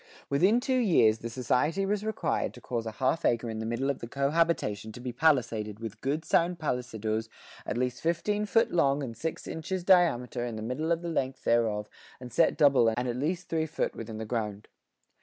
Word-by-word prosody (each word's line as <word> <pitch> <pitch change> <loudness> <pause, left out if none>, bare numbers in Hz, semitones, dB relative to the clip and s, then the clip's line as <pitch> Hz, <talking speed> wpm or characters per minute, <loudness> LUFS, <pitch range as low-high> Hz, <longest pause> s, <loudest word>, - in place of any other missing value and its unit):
Within 185 +12 +4
two 260 0 +1
years 115 - +4
the 115 - -5
society 130 - 0
was 205 +1 -1
required 220 0 -1
to - - -11
cause 115 -2 -4
a 110 - -5
half 130 +7 0
acre 115 -1 +1
in 110 - -5
the 110 - -3
middle 120 +4 -1
of 140 - -6
the 115 - -6
"co 140 +3 -1
habitation" 150 -11 0
to 120 - -9
be 125 0 -4
palisaded 115 -8 +1
"with 115 -1 -7
good 145 +4 -1
sound 175 +1 +2
pallisadoes 115 -6 -2 0.4
at - - -2
least 125 0 -1
thirteen 205 +6 0
foot 225 +2 +3
long 140 -4 +2
and 115 -4 -5
six 160 +5 -4
inches 175 +3 -4
diameter 145 -10 +3
in 120 -2 -4
the 110 - -5
middle 140 +8 -2
of 170 +1 0
the - - -3
length 130 -5 -2
thereof, 110 -3 +1 0.3
and 125 -1 -10
set 165 - +3
double 135 -5 +5
and 125 +1 -1
at 120 - -2
least 170 +7 -2
three 160 -1 -1
foot 155 - -2
within 110 -1 -6
the 110 - -4
ground." 105 -3 -3
130 Hz, 210 wpm, -29 LUFS, 115-165 Hz, 0.4 s, double